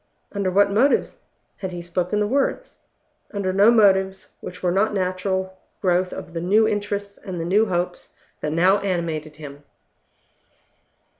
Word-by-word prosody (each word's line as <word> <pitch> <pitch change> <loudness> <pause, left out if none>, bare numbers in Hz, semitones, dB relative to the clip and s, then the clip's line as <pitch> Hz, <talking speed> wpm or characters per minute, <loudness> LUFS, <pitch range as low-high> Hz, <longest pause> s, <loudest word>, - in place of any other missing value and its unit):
Under 200 -2 -1
what 200 +2 +3
motives 250 +8 +2 0.4
had 190 -2 -5
he 175 -1 -6
spoken 180 +4 -1
the 210 - +2
words? 270 +6 -1 0.6
Under 190 -2 -1
no 200 +3 +6
motives 190 -4 +3
which 180 +1 -9
were 180 - +2
not 205 +3 +1
the - - +1
natural 185 0 -2 0.2
growth 180 -1 +1
of - - -8
the 165 - -3
new 210 +5 +3
interests 205 -1 -3
and 185 -4 -6
the 165 - -3
new 205 +5 +3
hopes 175 -1 -3 0.3
that 150 - -3
now 185 +5 +4
animated 165 -5 -3
him. 145 -1 -10
190 Hz, 155 wpm, -22 LUFS, 175-205 Hz, 0.6 s, no